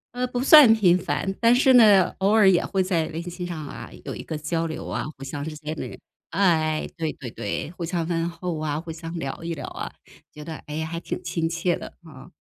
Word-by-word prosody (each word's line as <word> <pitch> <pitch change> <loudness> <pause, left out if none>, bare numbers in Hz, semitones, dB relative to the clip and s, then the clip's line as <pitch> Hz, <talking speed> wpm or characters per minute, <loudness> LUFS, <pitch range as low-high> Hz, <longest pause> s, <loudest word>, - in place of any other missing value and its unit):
呃， 250 0 0
不 245 0 -3
算 275 -5 +9
频 180 -5 +4
繁， 175 +3 -2
但 230 +1 +6
是 260 +1 +5
呢， 210 -6 +7
偶 195 +1 +2
尔 215 -3 +6
也 175 - +3
会 190 -2 0
在 175 -4 +1
微 165 +1 -5
信 175 +1 -6
上 155 -4 -6
啊， - - -8 0.2
有 - - -5
一 - - -7
个 155 - -5
交 165 +2 -2
流 160 - -5
啊， - - -2
互 135 - -8
相 145 +1 -5
之 155 0 -5
间 155 +1 -5
的 - - -6 0.3
哎， 160 -5 +1
对 160 -2 -2
对 125 -5 -8
对， 105 +8 -4
互 175 -1 -7
相 165 -1 -2
问 170 -1 -1
候 170 -1 -4
啊， 155 -1 -2
互 165 -1 -7
相 165 +1 -8
聊 140 +3 -5
一 170 0 -3
聊 145 - -6
啊， - - -6 0.4
觉 150 0 -11
得， 160 -2 -6
诶， 155 +2 -3
还 165 +1 -5
挺 180 - -5
亲 165 -2 -2
切 170 +1 0
的， - - -8 0.2
啊。 135 -4 -13
165 Hz, 250 characters per minute, -24 LUFS, 155-185 Hz, 0.4 s, 算